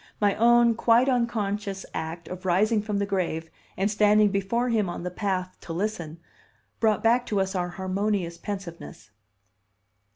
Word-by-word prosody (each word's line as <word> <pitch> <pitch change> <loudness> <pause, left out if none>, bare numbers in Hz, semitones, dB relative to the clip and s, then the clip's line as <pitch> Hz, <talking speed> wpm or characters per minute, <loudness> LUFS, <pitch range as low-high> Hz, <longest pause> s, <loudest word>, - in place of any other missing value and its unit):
My 205 -1 +3
own 235 +1 +5
quite 235 +2 +3
unconscious 210 -6 -1
act 165 +1 -5
of 185 +1 -7
rising 210 +5 +2
from 210 -1 -2
the 200 - 0
grave 170 -5 -2 0.3
and 195 +3 +1
standing 210 0 +4
before 200 +5 0
him 215 -5 +1
on 175 - -5
the 180 - -3
path 185 -1 -2
to 165 - -7
listen 170 -4 -3 0.6
brought 215 -2 +2
back 235 +2 +4
to 205 - 0
us 190 0 -1
our 180 -2 -1
harmonious 190 -1 -2
pensiveness. 170 - -7
200 Hz, 155 wpm, -26 LUFS, 180-215 Hz, 0.6 s, own